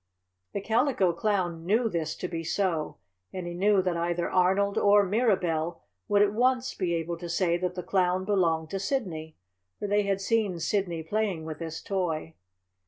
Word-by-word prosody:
The 200 - -2
Calico 220 -4 +2
Clown 175 -3 -1
knew 220 +7 +2
this 165 -6 -2
to 180 - -4
be 165 -2 -4
so, 165 -1 -1 0.3
and 185 -2 -5
he 175 - -5
knew 195 +2 +3
that 180 -2 0
either 170 +1 -1
Arnold 190 +2 +2
or 205 0 +5
Mirabell 180 -6 0 0.2
would 205 0 +4
at 205 0 +1
once 255 +2 +1
be 175 -3 -1
able 165 +1 -3
to 175 -1 -6
say 170 0 +1
that 180 0 -2
the 180 - -4
Clown 185 0 +1
belonged 165 -6 +1
to 195 - -2
Sidney, 180 - -3 0.4
for - - -5
they 205 +1 +3
had 200 -1 0
seen 205 -2 0
Sidney 175 -2 -1
playing 195 -2 -1
with 155 -2 -6
this 165 -1 -6
toy. 165 -5 -2
185 Hz, 175 wpm, -28 LUFS, 170-205 Hz, 0.4 s, or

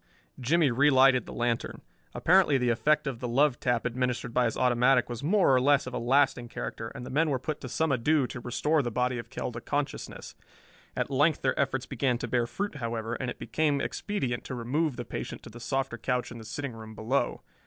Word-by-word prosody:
Jimmie 145 +3 +3
relighted 135 0 +5
the - - -7
lantern. 120 -1 -2 0.3
Apparently 180 -5 +4
the 125 -1 +1
effect 150 +7 +2
of 135 -4 -3
the 125 - -3
love 130 +2 +2
tap 120 -2 0
administered 125 0 -2
by 125 0 +3
his 115 - -1
automatic 125 0 +3
was 120 -1 -5
more 175 -1 +3
or 130 - +4
less 140 +1 +3
of 130 - -7
a - - -2
lasting 125 -1 +2
character, 115 - -5
and 125 - -7
the - - -7
men 155 +4 +2
were 135 - +1
put 150 +4 -5
to 130 - -6
some 160 +4 0
ado 135 +3 +2
to 125 - -6
restore 150 +6 +1
the 120 - -2
body 125 +1 0
of 115 0 -8
Kell - - -4
to 120 0 -7
consciousness. 145 +3 -4 0.6
At - - -2
length 145 +3 +2
their 130 - +1
efforts 135 -1 0
began 130 -1 0
to - - -4
bear 120 -1 +1
fruit, 200 +3 -4
however, 115 -2 -3
and 125 +1 -3
it - - -6
became 150 -3 0
expedient 135 - -2
to 130 - -5
remove 135 +5 -1
the 120 - -5
patient - - -6
to 115 - -11
the 120 - -11
softer 135 -1 -2
couch 125 -1 -1
in 115 - -8
the 110 - -10
sitting 140 +3 -5
room 110 -1 -10
below. 120 +4 -1
125 Hz, 220 wpm, -28 LUFS, 120-145 Hz, 0.6 s, relighted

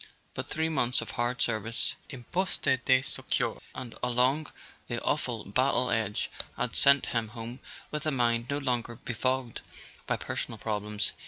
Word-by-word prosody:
But - - -4
three 160 0 0
months 125 -6 +2
of - - -5
hard 120 +1 +1
service 115 0 0 0.2
in 130 -4 -8
Postes 155 -4 +1
de 130 0 +5
Secours - - -1
and 130 -3 -6
along 125 +5 +2 0.4
the 120 - -2
aw¬ 145 - +1
ful 120 -7 -3
battle 125 +4 +2
edge 110 -2 0 0.3
had 125 -2 -1
sent 140 0 +6
him 115 -2 0
home 115 +3 -7 0.3
with 150 +1 -2
a - - +3
mind 120 -2 +2
no 140 - 0
longer 120 -4 0
befogged 125 +1 -1 0.5
by - - +1
personal - - -3
problems. 105 -1 -2
125 Hz, 160 wpm, -29 LUFS, 115-135 Hz, 0.5 s, sent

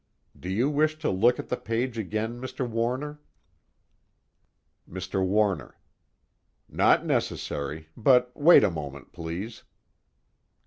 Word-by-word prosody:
Do 90 - -8
you 110 +8 +1
wish 155 +1 +1
to 155 - -1
look 115 +6 +3
at - - -7
the - - 0
page 115 +2 -2
again, 110 +3 -3
Mr. 130 0 -4
Warner? 125 +6 -2 1.7
MR. 95 - -3
WARNER: 95 -6 0 0.9
Not - - +3
necessary, 75 +2 -2
but 125 +1 +3
wait 155 -1 +7
a 100 - +3
moment, 70 -4 -7
please. 85 +8 -6
115 Hz, 115 wpm, -27 LUFS, 95-130 Hz, 1.7 s, wait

